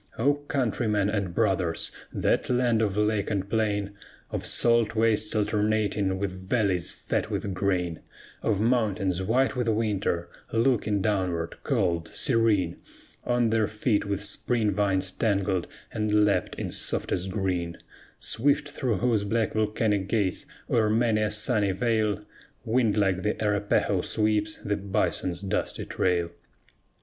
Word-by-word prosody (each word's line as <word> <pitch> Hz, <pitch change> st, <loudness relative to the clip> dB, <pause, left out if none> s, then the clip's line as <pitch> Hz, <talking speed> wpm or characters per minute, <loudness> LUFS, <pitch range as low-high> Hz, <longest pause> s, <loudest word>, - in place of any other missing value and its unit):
O 140 Hz, +6 st, +3 dB
countrymen 120 Hz, -8 st, -1 dB
and 100 Hz, -5 st, -2 dB
brothers! 95 Hz, -6 st, +1 dB, 0.2 s
that -, -, 0 dB
land 120 Hz, -3 st, +2 dB
of 105 Hz, -2 st, 0 dB
lake 105 Hz, -1 st, +1 dB
and 100 Hz, -2 st, -2 dB
plain, 105 Hz, -2 st, 0 dB, 0.4 s
Of -, -, -1 dB
salt 115 Hz, -1 st, +4 dB
wastes 110 Hz, -1 st, +2 dB
alternating 105 Hz, -2 st, 0 dB
with 95 Hz, -1 st, -5 dB
valleys 95 Hz, -7 st, +2 dB
fat -, -, -3 dB
with 100 Hz, -, -3 dB
grain; 90 Hz, -3 st, -1 dB, 0.4 s
Of 105 Hz, -3 st, 0 dB
mountains 105 Hz, -6 st, +1 dB
white 125 Hz, +8 st, +1 dB
with 125 Hz, -2 st, -1 dB
winter, 105 Hz, -6 st, 0 dB, 0.2 s
looking 115 Hz, -4 st, +1 dB
downward, 90 Hz, -5 st, -1 dB
cold, 90 Hz, -, 0 dB
serene, 110 Hz, -, +2 dB, 0.5 s
On 120 Hz, -2 st, +1 dB
their 110 Hz, -2 st, +2 dB
feet 105 Hz, 0 st, 0 dB
with 100 Hz, 0 st, -2 dB
spring 110 Hz, +1 st, +1 dB
vines 95 Hz, -2 st, +1 dB
tangled 100 Hz, -4 st, 0 dB, 0.2 s
and 105 Hz, -1 st, +2 dB
lapped 100 Hz, -, 0 dB
in -, -, -4 dB
softest 90 Hz, +2 st, 0 dB
green; 90 Hz, -3 st, -2 dB, 0.4 s
Swift 145 Hz, +5 st, 0 dB
through 125 Hz, -5 st, -1 dB
whose 115 Hz, -2 st, +1 dB
black 110 Hz, +2 st, 0 dB
volcanic 105 Hz, -2 st, 0 dB
gates, 100 Hz, -5 st, 0 dB, 0.2 s
o'er 110 Hz, -3 st, +2 dB
many 110 Hz, -1 st, +2 dB
a 105 Hz, -, +1 dB
sunny 105 Hz, -2 st, +1 dB
vale, 105 Hz, -1 st, 0 dB, 0.4 s
Wind 115 Hz, -2 st, +2 dB
like 95 Hz, -3 st, +2 dB
the 105 Hz, +3 st, -1 dB
Arapahoe 105 Hz, -1 st, +1 dB
sweeps 105 Hz, -1 st, 0 dB
the 105 Hz, -1 st, 0 dB
bison's 95 Hz, -2 st, -1 dB
dusty 100 Hz, -, -2 dB
trail! 85 Hz, -2 st, 0 dB
105 Hz, 135 wpm, -26 LUFS, 95-115 Hz, 0.5 s, salt